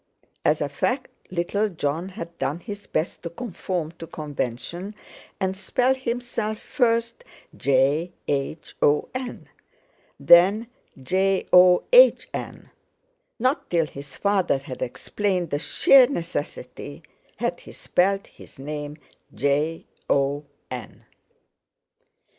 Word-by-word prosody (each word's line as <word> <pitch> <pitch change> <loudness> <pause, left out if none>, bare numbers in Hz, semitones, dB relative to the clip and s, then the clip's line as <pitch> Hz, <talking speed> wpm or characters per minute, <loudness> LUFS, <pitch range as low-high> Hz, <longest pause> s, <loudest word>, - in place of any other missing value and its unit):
As - - +2
a - - +1
fact 255 +1 -1 0.2
little 185 +4 0
Jon 165 +1 -2
had 170 -4 -8
done 150 +5 -1
his 205 +1 -8
best 160 - -2
to 170 - -5
conform 180 -5 -4
to 165 - -7
convention 150 - -5 0.4
and 190 0 -1
spell 245 +7 +1
himself 235 -4 -3
first 230 -2 0 0.3
Jhon, 140 +6 +2
then 140 +2 -1 2.5
John; 185 +1 +4 1.5
not 255 +5 0
till 170 -2 +2
his 140 -2 -10
father 200 -7 +2
had 135 -1 -9
explained 180 +6 -2
the 145 - 0
sheer 260 - +6
necessity, 165 - -5 0.3
had - - -2
he - - -13
spelled 195 +2 +1
his - - -16
name 150 +1 -6 0.4
Jon. 150 +4 0
180 Hz, 95 wpm, -24 LUFS, 150-205 Hz, 2.5 s, sheer